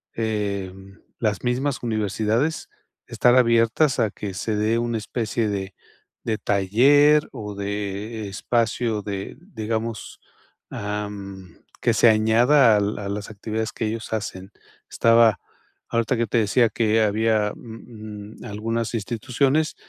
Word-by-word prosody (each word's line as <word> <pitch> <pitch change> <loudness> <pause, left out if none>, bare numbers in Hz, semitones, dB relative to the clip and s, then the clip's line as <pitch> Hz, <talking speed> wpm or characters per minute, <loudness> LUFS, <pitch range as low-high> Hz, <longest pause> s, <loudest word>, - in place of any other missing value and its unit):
eh, 105 -4 -2
mm, 95 0 -15 0.2
las 105 -3 -1
mismas 125 +2 -1
universidades, 110 +6 -1 0.4
estar 125 0 +3
abiertas, 115 +4 +3
a 110 - +2
que 100 0 -6
se 110 +3 -2
dé 110 +2 +1
una 120 -1 -1
especie 110 +1 -2
de 95 -1 -4 0.5
de 110 -1 0
taller, 140 +10 +4
o 105 -1 -6
de 100 +1 -4
espacio 115 +1 -1
de 100 -1 -5
Digamos, 115 - -5 0.5
am, 100 -3 -6 0.2
que 120 - +2
se 110 - +5
añada 115 +3 +5
al 105 +1 -1
a 100 -1 -5
las 100 +1 -4
actividades, 110 +1 -4
que 110 - -2
ellos 110 +1 -5
hacen. 100 -3 -5 0.4
Estaba, 115 -1 +4 0.5
ahorita, 115 +2 +1
que 115 - +1
te 110 - 0
decía, 115 +2 +3
que 110 +1 +1
había, 110 0 +1
mm, 110 -2 -10
algunas 115 +3 -3
instituciones. 130 +7 0
110 Hz, 125 wpm, -23 LUFS, 105-115 Hz, 0.5 s, se